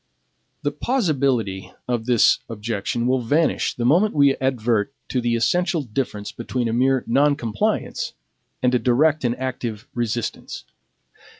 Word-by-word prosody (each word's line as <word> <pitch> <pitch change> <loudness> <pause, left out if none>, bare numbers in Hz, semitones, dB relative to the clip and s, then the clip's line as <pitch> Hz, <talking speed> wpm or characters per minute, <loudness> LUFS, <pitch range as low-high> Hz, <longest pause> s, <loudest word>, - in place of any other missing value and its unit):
The - - 0
plausibility 135 - 0 0.2
of 120 -2 -2
this 120 -3 +4
objection 115 +1 -3
will 130 +1 +2
vanish 150 +8 +1
the 120 - -2
moment 175 - +3
we 140 -2 +5
advert 120 -3 0 0.2
to 125 - 0
the 120 0 +1
essential 175 +7 +1
difference 105 -4 -4
between 120 +1 -3
a 115 - -1
mere 130 +2 +2
NON 140 +4 +3
COMPLIANCE 110 -6 -2 0.5
and 125 0 +3
a 125 - +3
DIRECT 145 +5 +2
and 120 0 +1
ACTIVE 120 -5 -4
RESISTANCE. 120 -1 -3
125 Hz, 135 wpm, -22 LUFS, 115-140 Hz, 0.5 s, we